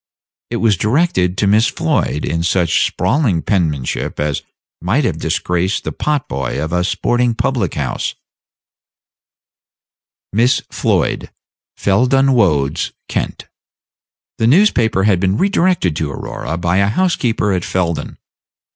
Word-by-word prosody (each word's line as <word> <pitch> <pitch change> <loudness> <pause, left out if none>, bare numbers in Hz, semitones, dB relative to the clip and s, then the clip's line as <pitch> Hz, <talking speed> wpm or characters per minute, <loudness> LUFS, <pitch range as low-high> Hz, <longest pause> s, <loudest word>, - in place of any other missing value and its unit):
It - - -3
was 110 -4 +2
directed 105 - +1
to - - +1
Miss 105 +4 +4
Floyd, 75 - -1
in 85 0 -1
such 85 0 +2
sprawling 100 - 0
penmanship 80 - -1
as 75 -1 -1 0.4
might 105 - +1
have 85 -10 -1
disgraced 90 +4 -1
the - - -3
pot 150 -3 -1
boy 65 0 -3
of 80 +3 -3
a 90 0 +1
sporting 120 +4 0
public 120 - -1
house: 70 -5 -2 2.2
"MISS 120 +5 +2
FLOID, - - 0 0.5
fell 100 +6 +2
dun 135 +1 +3
wodes, 80 - +1
kent." - - -3 0.9
The 110 - +2
newspaper 120 - +3
had 100 -3 +3
been 95 +2 +1
redirected 180 - +1
to 80 -3 -2
Aurora 75 +3 -5
by 85 +1 0
the 100 - +3
housekeeper 115 - +1
at 90 -2 -1
Felden. 85 -3 -2
95 Hz, 130 wpm, -17 LUFS, 85-120 Hz, 2.2 s, Miss